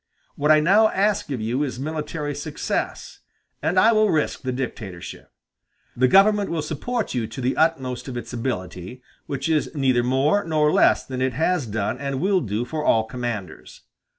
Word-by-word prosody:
What 150 +1 -1
I 155 0 +6
now 205 +7 +5
ask 205 -2 0
of 130 -5 -3
you 120 +5 -1
is 135 -4 -3
military 150 0 -4
success, 145 +1 -4 0.4
and 180 +3 +2
I 225 - +6
will 215 -1 +3
risk 155 -4 0
the 130 - -2
dictatorship. 100 -9 -6 0.6
The 130 +1 +3
government 200 +5 +4
will 165 -2 -2
support 220 - -3
you 120 -3 -1
to - - -9
the 130 +1 0
utmost 135 -7 0
of 125 -2 -5
its 120 - -7
ability, 115 -1 -5 0.2
which 140 0 -3
is 155 -2 +1
neither 130 -4 +2
more 135 +11 +2
nor 155 -2 +2
less - - +4
than 130 -1 -5
it 130 -1 0
has 160 0 0
done 110 +3 -2
and 140 -1 -3
will 190 +2 +2
do 110 0 -2
for 155 +4 -4
all 110 -6 +3
commanders. 110 -7 -6
140 Hz, 180 wpm, -23 LUFS, 120-160 Hz, 0.6 s, I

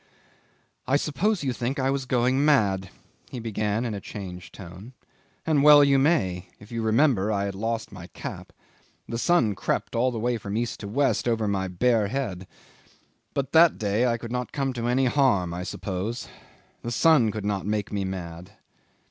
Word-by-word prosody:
'"I 135 +2 +3
suppose 170 +7 0
you 130 -2 0
think 125 +4 -3
I 135 0 +1
was 135 -2 -2
going 130 +2 +2
mad," 100 -11 +2 0.4
he 125 - -6
began 110 0 -2
in 115 - -2
a 100 - -5
changed 90 -2 -8
tone. 95 +6 -11 0.5
"And 155 -3 +2
well 145 0 +8
you 140 -1 +4
may, 95 - +1
if 105 +2 -15
you 115 -1 -3
remember 110 -2 +2
I 100 -1 0
had 100 - -3
lost 115 +3 -3
my - - -10
cap. - - -8 0.6
The 115 - -4
sun 125 -9 +3
crept 95 - -2
all 125 +3 +2
the 120 - -5
way 120 +1 -1
from 100 +1 -4
east 120 -1 -2
to 100 - -6
west 135 +4 +1
over 115 -2 +1
my 95 -2 -1
bare 110 +3 +1
head, 100 -7 -4 0.9
but 140 -1 -2
that 165 +1 +6
day 105 +4 +1
I 115 -1 +1
could 115 0 -8
not 125 0 -3
come 135 -2 -2
to 120 -1 -3
any 130 +2 +2
harm, 120 -10 +2
I 90 - -4
suppose. 100 +5 -4 0.5
The 120 - -5
sun 125 -1 +4
could 105 -1 -5
not 100 -2 -2
make 105 -1 -2
me 100 -1 -1
mad. 90 -1 -6
115 Hz, 185 wpm, -25 LUFS, 100-130 Hz, 0.9 s, well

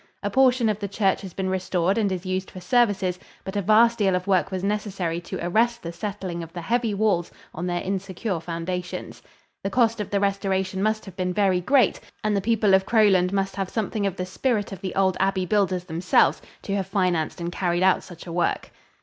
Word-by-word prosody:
A 205 - -1
portion 255 -1 +4
of 210 -1 0
the 200 - -3
church 195 -1 +1
has 190 -2 -8
been 190 -1 -2
restored 185 0 0
and 210 -4 +1
is 185 0 -4
used 185 0 -2
for 185 - -9
services, 190 -3 +1 0.2
but 190 - -6
a 205 - +1
vast 225 +4 +4
deal 195 -3 +3
of 180 0 -2
work 195 -1 +2
was 190 -1 -4
necessary 195 -5 -2
to - - -6
arrest 235 +6 +1
the 170 0 -5
settling 185 -2 -4
of 165 -1 -8
the 175 - -5
heavy 230 +4 0
walls 200 -4 +1 0.2
on 175 +3 -4
their 175 0 -1
insecure 190 0 -3
foundations. 175 +2 -5 0.4
The 195 - -1
cost 230 +1 +2
of 205 - -5
the 200 - +1
restoration 195 -1 0
must 215 +1 0
have 190 -3 -10
been 180 -1 -2
very 190 -3 +2
great, 255 +1 +3 0.2
and 215 -1 +1
the 200 - +1
people 215 -1 +2
of 190 0 +5
Crowland 195 -5 +4
must 195 -1 -1
have 195 -1 -2
something 215 -2 -1
of 190 - -3
the 180 - -3
spirit 210 +2 -1
of 190 -2 -8
the 185 - -4
old 190 -1 +2
abbey 190 -1 +1
builders 185 -2 +1
themselves, 175 0 +2 0.2
to 200 - -2
have 195 -2 -2
financed 180 -6 0
and 170 0 -3
carried 175 0 0
out 190 0 +4
such 175 -2 -12
a 170 - -7
work. 175 - -1
190 Hz, 220 wpm, -24 LUFS, 180-210 Hz, 0.4 s, of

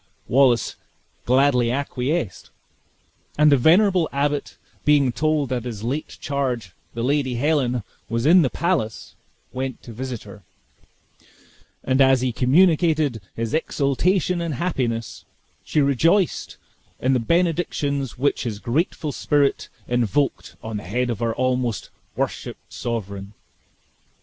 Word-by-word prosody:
Wallace 125 -2 +3 0.5
gladly 125 -1 +3
acquiesced; 135 - -2 0.9
and 150 0 +5
the - - +7
venerable 175 - +4
abbot 145 +1 -1 0.3
being 145 -3 +4
told 150 +1 0
that 125 -3 -2
his 110 -4 -6
late 135 +6 -3
charge, 125 -9 -2 0.2
the 115 - -2
Lady 135 -1 +1
Helen, 125 -3 +1 0.3
was 115 +2 -1
in 175 +4 +7
the 135 - +2
palace, 160 - -2 0.4
went 130 -1 -4
to 115 - -10
visit 125 0 -5
her; 105 0 -12 1.4
and 130 +1 +2
as 135 -1 +5
he 130 -1 0
communicated 155 - +3
his 115 -1 -3
exultation 165 +4 +1
and 165 -4 -2
happiness, 120 - -2 0.4
she 150 - +1
rejoiced 165 - +1 0.4
in 130 +1 +2
the 130 - +3
benedictions 150 -3 0
which 140 +3 +1
his 115 -5 -3
grateful 150 - -1
spirit 145 -1 +1 0.2
invoked 120 +3 0
on 110 -1 -4
the 105 - -7
head 120 +6 -1
of 110 - -4
her 115 -1 -1
almost 125 -4 -1 0.2
worshiped - - -4
sovereign. 100 -3 -5
130 Hz, 125 wpm, -22 LUFS, 120-150 Hz, 1.4 s, the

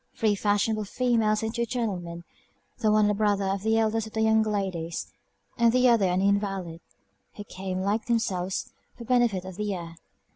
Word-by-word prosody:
Three 220 -3 +2
fashionable 205 +1 0
females, 225 -2 +1
and 220 0 -2
two 235 -1 -1
gentlemen; 180 -8 -3 0.6
the 215 - +2
one 215 0 +4
a 210 - +2
brother 205 -1 +1
of 195 0 -1
the 220 +2 +2
eldest 220 0 +1
of 220 - -13
the 220 - -1
young 220 0 +4
ladies, 190 -6 -3 0.5
and 235 -1 +5
the 255 +1 +4
other 225 -5 +4
an 180 +1 +1
invalid, 195 -4 -1 0.5
who 205 - -7
came, 185 -1 -5
like 205 +3 -1
themselves, 190 -6 -1 0.2
for 235 - -9
the - - -14
benefit 240 -7 +2
of 190 -1 -8
the 210 -2 -2
air. 170 -2 -8
210 Hz, 185 wpm, -26 LUFS, 190-220 Hz, 0.6 s, and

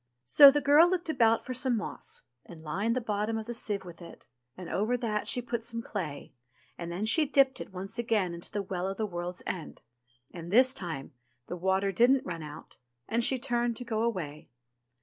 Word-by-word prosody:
So 280 - +10
the 290 +1 +1
girl 295 +5 +6
looked 350 -2 -1
about 230 -7 +3
for 255 - -4
some 255 -1 +1
moss, 210 - -4 0.2
and 160 -2 -12
lined 200 +9 -1
the 255 - 0
bottom 215 0 -1
of 220 - -5
the 240 - -5
sieve 205 -4 -2
with 175 0 -11
it, 170 - -12 0.3
and 180 - -8
over 220 +5 0
that 220 -3 -2
she 245 - 0
put 235 -1 -3
some 230 0 -3
clay, 155 -14 -6 0.4
and 170 0 -6
then 185 +5 -2
she 300 +7 +2
dipped 275 -1 +3
it - - -8
once 190 +5 -6
again 215 -7 0
into 170 0 -7
the 205 - -2
Well 185 -1 -3
of 195 0 -4
the 220 - -1
World's 175 -2 -5
End; 175 -4 -6 0.5
and 170 -1 -8
this 255 +6 +5
time, 165 - -6 0.3
the - - -5
water 190 +2 0
didn't 250 +6 +3
run 170 -3 -5
out, 150 -1 -9 0.3
and 235 +1 0
she 265 - +2
turned 240 -1 -1
to 245 - -6
go 220 -2 -1
away. 180 -11 -3
215 Hz, 210 wpm, -29 LUFS, 180-240 Hz, 0.5 s, So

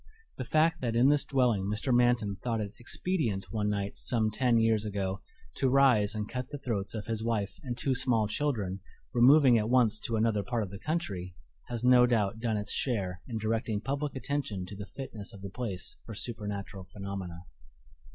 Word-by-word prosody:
The - - -1
fact 160 +4 +2
that 115 -3 -1
in 125 +4 +5
this 145 -1 +3
dwelling 125 -9 +1
Mr. 105 +6 0
Manton 120 -5 +2
thought 115 0 -2
it 105 -1 -4
expedient 120 - -2
one 105 -2 0
night 100 -1 -2
some 110 -3 0
ten 120 +2 +2
years 115 -2 +3
ago 100 -2 -3 0.4
to 135 - +2
rise 125 -6 +4
and 105 -1 -3
cut 125 +2 -5
the 145 - -5
throats 110 -6 -3
of 105 - -4
his 110 -1 -2
wife 105 -4 -2
and 125 -4 -5
two 130 +2 +1
small 120 -4 +2
children, 105 -7 -1 0.3
removing 125 0 +6
at 105 +1 -1
once 120 -4 +4
to 115 - -2
another 110 -1 +2
part 120 +1 -1
of 95 - -7
the 100 - -8
country, 100 - -3 0.3
has 120 -1 -4
no 125 -1 +7
doubt 110 -3 +1
done 115 -2 0
its 105 -1 -4
share 95 -8 -1
in 115 - -3
directing 110 0 -1
public 140 +5 -3
attention 130 -9 -3
to 90 - -9
the 100 +1 -7
fitness 115 -5 -7
of 100 -2 -12
the 100 - -6
place 100 -6 -3
for 110 - -8
supernatural 105 -4 -5
phenomena. 95 -2 -6
110 Hz, 190 wpm, -30 LUFS, 100-125 Hz, 0.4 s, no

